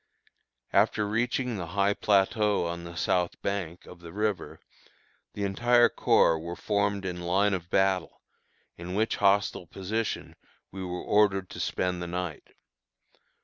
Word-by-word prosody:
After 105 -1 +3
reaching 120 +2 -1
the 85 -3 -5
high 100 +1 +3
plateau 105 0 +2
on 85 0 -4
the 85 0 -9
south 90 0 0
bank 90 -4 -3
of 90 - -12
the 85 -1 -11
river, 105 0 -2 0.7
the 100 - -4
entire 120 +5 +4
corps 80 -1 +3
were 85 +2 -6
formed 100 -1 -1
in 90 -1 -4
line 95 +4 +2
of 90 -2 -4
battle, 95 -2 +1 0.6
in 90 +2 -6
which 110 +2 +1
hostile 100 -3 +2
position 100 +5 -3 0.4
we 95 0 -6
were 90 -1 -4
ordered 95 -3 +2
to - - -8
spend 90 -1 -1
the 85 - -4
night. 90 -2 -5
95 Hz, 145 wpm, -28 LUFS, 90-105 Hz, 0.7 s, entire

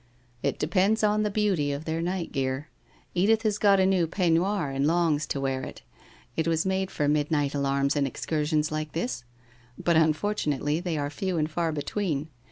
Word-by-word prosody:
' 120 - -35
It - - -1
depends 190 +7 +2
on 210 0 +3
the 210 - +1
beauty 195 -8 +1
of 140 +3 -4
their 160 +1 -2
night 175 0 -2
gear. 135 +2 -2 0.4
Edith 215 +5 +3
has 210 -2 0
got 200 -2 +5
a 190 - +4
new 185 -3 +2
peignoir 175 -1 +1
and 135 +2 +2
longs 160 -3 +2
to 140 - -2
wear 135 -1 -1
it. - - -8 0.5
It 160 - 0
was 165 +1 +1
made 190 0 0
for 150 - -1
midnight 150 -1 +1
alarms 140 0 +1
and 140 -1 +2
excursions 150 +2 -1
like 155 0 -3
this, 125 -6 -2 0.5
but 170 - +1
unfor 160 +5 +1
nately, 145 +2 0
they 175 -3 -2
are 145 0 -2
few 185 +3 -2
and 155 0 0
far 165 0 0
between. 155 0 -2
160 Hz, 190 wpm, -27 LUFS, 145-190 Hz, 0.5 s, got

